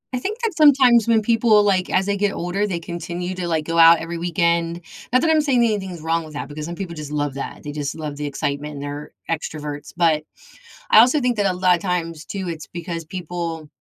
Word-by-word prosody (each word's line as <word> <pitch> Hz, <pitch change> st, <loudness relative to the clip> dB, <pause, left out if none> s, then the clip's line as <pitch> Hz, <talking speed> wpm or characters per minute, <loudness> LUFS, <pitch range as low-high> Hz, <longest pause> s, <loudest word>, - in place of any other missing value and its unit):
I -, -, -1 dB
think 430 Hz, -, -4 dB
that 440 Hz, -7 st, -1 dB
sometimes 260 Hz, -7 st, +6 dB
when 225 Hz, -2 st, +3 dB
people, 225 Hz, -2 st, +4 dB
like, 190 Hz, -3 st, +1 dB
as 190 Hz, +1 st, +2 dB
they 200 Hz, 0 st, 0 dB
get 205 Hz, 0 st, 0 dB
older, 185 Hz, +4 st, -1 dB
they 175 Hz, -3 st, -2 dB
continue 175 Hz, +2 st, -5 dB
to, 180 Hz, -1 st, -4 dB
like, 160 Hz, -2 st, -1 dB
go 165 Hz, 0 st, 0 dB
out 165 Hz, 0 st, +8 dB
every 165 Hz, 0 st, -5 dB
weekend 170 Hz, 0 st, 0 dB, 0.3 s
not 255 Hz, +1 st, +4 dB
that 325 Hz, -, +3 dB
I'm 310 Hz, -1 st, +4 dB
saying 255 Hz, -5 st, +2 dB
anything's 190 Hz, -7 st, -2 dB
wrong 165 Hz, +1 st, 0 dB
with 155 Hz, -1 st, -11 dB
that -, -, -4 dB
because 150 Hz, +1 st, -7 dB
some 170 Hz, -, -5 dB
people 175 Hz, -3 st, -6 dB
just 150 Hz, -1 st, -7 dB
love 145 Hz, -2 st, -1 dB
that, 140 Hz, -, -7 dB
they 145 Hz, -, -5 dB
just 145 Hz, -1 st, -4 dB
love 150 Hz, -2 st, -5 dB
the 150 Hz, 0 st, -3 dB
excitement 145 Hz, +1 st, -3 dB
and 140 Hz, -, -6 dB
they're 145 Hz, +1 st, -6 dB, 0.2 s
extroverts, 150 Hz, -2 st, -4 dB
but, 160 Hz, -3 st, +3 dB, 0.7 s
I 215 Hz, -, +9 dB
also 255 Hz, +6 st, +5 dB
think 245 Hz, -2 st, 0 dB
that 200 Hz, -1 st, +2 dB
a 185 Hz, -, +1 dB
lotta 180 Hz, -1 st, +2 dB
times 165 Hz, -4 st, -3 dB
too, 195 Hz, -2 st, -5 dB
it's 160 Hz, -2 st, -6 dB
because 170 Hz, -1 st, -6 dB
people 170 Hz, -2 st, -5 dB
170 Hz, 230 wpm, -21 LUFS, 155-205 Hz, 0.7 s, I